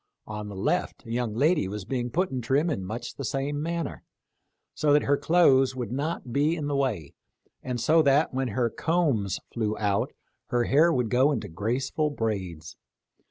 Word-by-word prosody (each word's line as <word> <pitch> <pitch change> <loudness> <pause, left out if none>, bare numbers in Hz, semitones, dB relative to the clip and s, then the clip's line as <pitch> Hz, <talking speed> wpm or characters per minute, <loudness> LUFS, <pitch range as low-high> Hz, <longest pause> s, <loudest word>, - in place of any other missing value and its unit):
On 105 -1 -6
the 100 - -8
left 175 - -1
a 115 - -8
young 120 -2 -1
lady 150 - +2
was 100 0 -5
being 125 +1 -2
put 180 +7 0
in 130 -1 -2
trim 140 +8 +1
in 95 - -2
much 110 +6 -5
the 140 - -5
same 140 +3 -2
manner, 170 -1 -3 0.7
so 150 -1 +2
that 145 - +4
her 140 - +3
clothes 140 -4 +4
would 120 -4 -4
not 140 -2 -3
be 150 +5 +2
in 155 -3 -4
the 145 0 -1
way, 110 - -1 0.5
and 125 -1 -3
so 160 +7 +4
that, 140 0 +3
when 130 0 0
her 120 +1 0
combs 145 - 0
flew 110 -2 -1
out, 100 -2 0 0.4
her 120 -1 +1
hair 155 +7 +4
would 125 -6 0
go 130 +4 +4
into 145 - -2
graceful 125 - -1
braids. 95 - -4
130 Hz, 185 wpm, -27 LUFS, 110-145 Hz, 0.7 s, that